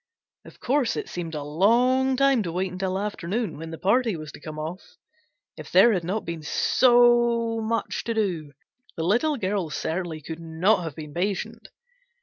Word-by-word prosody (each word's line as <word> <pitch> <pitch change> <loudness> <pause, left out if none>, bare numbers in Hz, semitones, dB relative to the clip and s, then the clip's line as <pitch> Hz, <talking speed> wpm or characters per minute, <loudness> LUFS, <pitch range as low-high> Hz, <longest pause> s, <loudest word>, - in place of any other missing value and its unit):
Of - - -15
course 260 -2 +1
it - - -4
seemed 165 -2 -5
a 150 - -4
long 245 - +3
time 275 -3 +4
to 175 -5 -3
wait 185 +2 -2
until 185 +1 -2
afternoon, 205 0 -3
when 165 0 -7
the 165 - -7
party 225 +3 +2
was 155 -1 -8
to - - -12
come 155 0 -8
off. 160 +5 -7 0.6
If - - -10
there 235 - +6
had 180 -4 -1
not 195 +6 -3
been 170 -1 -5
so 240 +4 +3
much 225 +1 -2
to 230 - -2
do, 170 -9 -2 0.4
the 160 - -2
Little 245 - +2
Girls 185 -7 -2
certainly 165 -1 -3
could 160 +2 -8
not 165 +6 +1
have 160 -5 -6
been 150 -2 -9
patient. 190 +3 -3
190 Hz, 175 wpm, -25 LUFS, 165-230 Hz, 0.6 s, there